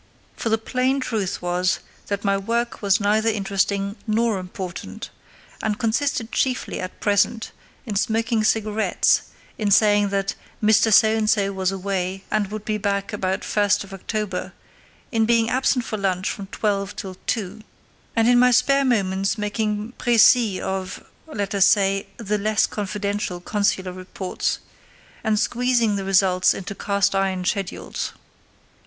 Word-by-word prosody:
For 230 - -3
the 220 - +3
plain 255 +4 0
truth 215 -9 -2
was 180 +1 +1 0.3
that 200 0 -3
my 200 0 +3
work 235 +4 -2
was 200 -2 +3
neither 215 +2 +2
interesting 200 0 -1
nor 220 -1 +1
important, 180 -1 -7 0.5
and 210 -1 -1
consisted 230 0 -1
chiefly 260 -1 -1
at 185 0 -6
present 205 +2 +1 0.3
in 210 - -4
smoking 225 +1 +1
cigarettes, 215 0 +2 0.4
in 210 -2 0
saying 205 0 +4
that 195 0 -1 0.3
Mr 220 +1 +4
So 220 +2 +6
and 215 -1 +1
So 200 -2 +2
was 190 -1 0
away 190 0 -3
and 215 -2 +1
would 215 +1 -7
be 215 -1 -1
back 200 +1 -1
about 190 -2 -2
October 205 -1 0
1, 190 - -10 0.6
in 225 -2 +2
being 230 -1 +3
absent 255 -1 +1
for 215 - -3
lunch 185 -1 0
from 200 -2 -7
twelve 200 -1 -2
till 190 -2 -6
two, 210 -1 -2 0.5
and 225 0 +3
in 245 0 +5
my 250 0 +6
spare 275 +3 +3
moments 195 -5 +1
making 210 +1 -2
précis 235 -3 +5
of—let 195 +3 -5
us 195 -1 +5
say—the 195 +1 0
less 215 +1 +2
confidential 205 -2 -3
consular 190 -1 -1
reports, 185 0 -3 0.7
and 220 -2 +1
squeezing 240 -2 +1
the 195 - -2
results 185 -1 +3
into 195 +1 -6
cast 200 0 0
iron 190 -1 0
schedules. 195 -1 -3
205 Hz, 140 wpm, -23 LUFS, 195-225 Hz, 0.7 s, So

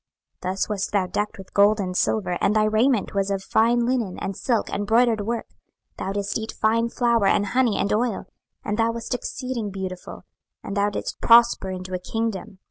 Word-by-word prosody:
26:016:013 185 - -2
Thus 190 - -2
wast 205 -2 -2
thou 200 -2 +2
decked 205 +3 -3
with 190 -1 -12
gold 205 +2 +4
and 185 -2 -3
silver; 185 -2 0
and 210 - +2
thy 215 - +4
raiment 220 +2 +2
was 200 -1 0
of 195 -1 -2
fine 235 +4 +2
linen, 240 -7 -1
and 195 - -4
silk, 235 +2 0
and 205 0 -2
broidered 230 -1 +3
work; 235 0 -2 0.5
thou 190 - -3
didst 200 +2 -2
eat 220 0 -5
fine 230 +2 +1
flour, 235 -4 +2
and 205 - +3
honey, 245 0 +1
and 200 - 0
oil: 225 0 0 0.4
and 210 +2 -2
thou 225 0 +3
wast 230 +2 -4
exceeding 250 -3 -4
beautiful, 185 -2 -7 0.4
and 200 - -5
thou 205 0 +2
didst 205 - -5
prosper 235 -4 +5
into 185 0 -6
a 185 - -1
kingdom. 220 0 -4
210 Hz, 200 wpm, -23 LUFS, 195-230 Hz, 0.5 s, prosper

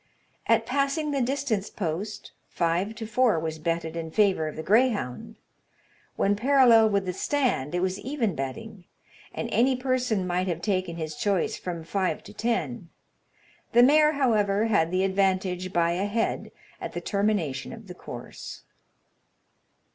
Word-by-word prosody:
At 225 0 +3
passing 280 +4 0
the 280 -2 0
distance 240 -5 -1
post, 200 +3 -4 0.2
five 175 +5 0
to 225 - -6
four 220 -4 +2
was 160 0 -4
betted 165 0 -2
in 165 -1 -4
favour 190 -3 +2
of 155 - -6
the 160 - -5
greyhound; 220 - +1 0.8
when 200 +1 +2
parallel 235 -2 +5
with 200 -2 0
the 180 - -2
stand, 240 - 0
it 175 - 0
was 185 +1 -1
even 240 -3 -1
betting, 175 +9 -6 0.5
and - - -4
any 260 +2 +3
person 250 -6 0
might 180 +1 -1
have 170 -1 -3
taken 185 -4 -1
his 155 -2 -4
choice 200 -1 0
from 170 -3 -5
five 185 +3 -1
to 205 - -12
ten: 175 - -2 0.8
the 240 +1 +7
mare, 300 +3 +5
however, 215 -7 +2
had 200 -8 +2
the 185 +2 +1
advantage 190 -1 0
by 170 -1 +2
a 185 +4 -1
head 225 +2 -1 0.3
at - - -5
the - - -4
termination 200 -10 -1
of 225 -1 -10
the 180 - -9
course. - - -9
200 Hz, 155 wpm, -26 LUFS, 175-230 Hz, 0.8 s, the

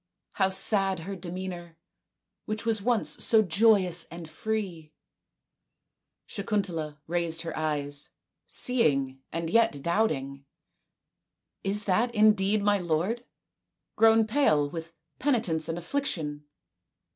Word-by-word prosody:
How 190 -1 +1
sad 195 -2 +2
her 195 +4 -6
demeanour, 175 -2 -7 0.7
which 215 +1 -4
was 225 -2 +1
once 235 +1 +1
so 220 -1 +5
joyous 190 -2 +3
and 170 0 -9
so 155 - -15
free! 185 -7 -4 0.7
" - - -58
Sakuntala 180 -8 -3
raised 170 -1 0
her 165 - -5
eyes, 145 -2 -2 0.4
seeing 140 - +1
and 165 0 -3
yet 180 -7 +2
doubting. 140 -8 -1 0.6
" - - -57
Is 210 +1 -1
that 230 +5 +1
indeed 210 -1 +4
my 205 0 +3
lord, 180 +8 -1 0.7
grown 225 0 +5
pale 215 - +2
with 165 0 -7 0.2
penitence 220 - +1
and 165 - -2
affliction 165 - -3
180 Hz, 115 wpm, -27 LUFS, 160-215 Hz, 0.7 s, so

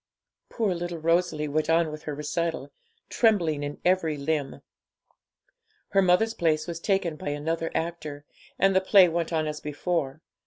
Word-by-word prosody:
Poor 215 -5 0
little 175 0 -4
Rosalie 165 -1 +1
went 155 +2 -1
on 165 -1 +3
with 155 0 -9
her 150 - -4
recital, 160 +3 -3 0.4
trembling 175 -10 +2
in 145 0 -5
every 175 -4 +2
limb. 145 -1 -2 1.3
Her 195 - +3
mother's 190 +5 +3
place 155 -5 +1
was 170 -1 -5
taken 185 -4 0
by 145 - -5
another 160 +3 -2
actor, 155 -3 -4 0.3
and 195 0 +3
the 190 - +5
play 190 -1 +6
went 170 0 -2
on 160 -1 0
as 150 0 -4
before. 150 -1 -3
165 Hz, 155 wpm, -26 LUFS, 150-180 Hz, 1.3 s, play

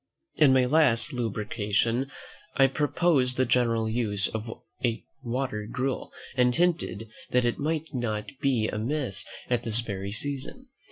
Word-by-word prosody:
In 150 -4 +6
my 130 -1 +5
last 130 -4 +3
lucubration 115 +2 0 0.5
I 135 - +6
proposed 140 -1 +2
the 130 - +3
general 115 -2 +2
use 110 -3 +1
of 110 +1 -5 0.7
water 120 -4 -3
gruel, 130 +1 -2 0.2
and 125 -1 +3
hinted 170 - 0 0.2
that 125 -1 +2
it 120 - 0
might 160 +2 -2
not 110 -5 -2
be 125 -6 +2
amiss 115 - -2 0.2
at 120 -2 +1
this 115 -1 +3
very 100 -3 -4
season. 145 - -4
125 Hz, 130 wpm, -27 LUFS, 110-135 Hz, 0.7 s, In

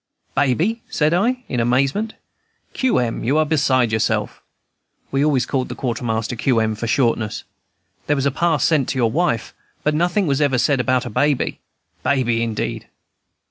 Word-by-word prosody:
"Baby!" 170 - +1
said 150 +1 +1
I, 245 +8 +1
in 125 - -2
amazement. 135 - +1 0.6
"Q. 260 -2 +1
M., 120 -2 -1
you 135 +6 +1
are 155 - +3
beside 135 -6 +2
yourself." 110 0 -1 0.7
(We 135 +1 +1
always 145 -4 +2
called 130 -2 -2
the - - -5
Quartermaster 115 -2 -2
Q. 120 0 +1
M. 110 0 +1
for 110 +2 -4
shortness.) 115 -3 0 0.6
"There 150 - +2
was 135 -1 -1
a 140 - +2
pass 160 -1 +1
sent 150 -6 +2
to 135 - -2
your 115 -3 +2
wife, 145 -7 0 0.3
but 150 - +1
nothing 175 +5 +1
was 140 -2 0
ever 140 -3 +2
said 130 +3 +2
about 125 0 +1
a 120 - -5
baby. 145 +4 0 0.4
Baby 120 -4 +1
indeed!" 115 -2 -3
135 Hz, 170 wpm, -20 LUFS, 120-155 Hz, 0.7 s, are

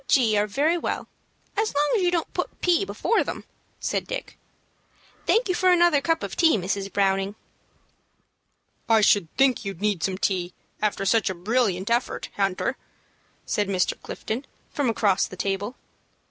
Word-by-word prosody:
G. 230 -6 +4
are 205 0 +2
very 305 - +1
well - - -3 0.5
as 430 -5 0
long 295 +1 +2
as 425 - +2
you 355 - +3
don't 345 -2 -1
put - - -4
P. 355 +2 +2
before 455 - +1
them," - - -5 0.4
said - - -2
Dick. - - -5 0.9
"Thank 460 +1 +3
you 370 - +1
for 370 +1 +3
another 345 -5 +5
cup 330 +2 0
of - - -4
tea, 325 -8 +4
Mrs. 195 +1 -3
Browning." 195 +1 +1 1.5
"I 225 -1 +5
should 205 -4 +4
think 265 -2 +3
you'd 195 -4 -5
need 205 -4 0
some 190 -1 -1
tea 180 -2 -1 0.3
after 205 -2 0
such 220 +1 +3
a 190 - -3
brilliant 200 0 0
effort, 240 +2 -1
Hunter," 195 -2 0 0.7
said 205 -1 0
Mr. 185 -2 +1
Clifton, 245 +5 -5 0.2
from 285 -4 0
across 205 -4 +2
the 185 - -11
table. 200 +5 -2
215 Hz, 160 wpm, -25 LUFS, 195-310 Hz, 1.5 s, another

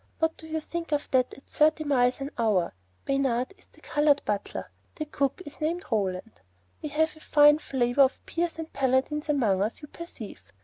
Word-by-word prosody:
What 320 0 +1
do 320 - -12
you 315 0 -2
think 335 +1 -5
of 295 0 -1
that 255 -1 +3
at 275 - -16
thirty 310 +1 +2
miles 255 -3 +2
an 275 +2 -4
hour? 210 -7 +1 0.3
Bayard 270 +1 0
is - - -21
the - - -22
colored 295 -1 +2
butler. 205 -1 -3 0.2
The 310 - -4
cook 280 +3 -1
is 290 +2 -11
named 340 +5 -1
Roland. 200 0 -2 0.4
We 305 - -4
have 315 +2 +1
a - - -15
fine 295 -1 +5
flavor 255 -2 +1
of 270 -1 +3
peers 340 -1 -2
and 320 0 -7
paladins 275 +3 +1
among 220 -10 +2
us, 220 +8 -2
you - - -7
perceive. 220 - -10
285 Hz, 190 wpm, -27 LUFS, 245-310 Hz, 0.4 s, fine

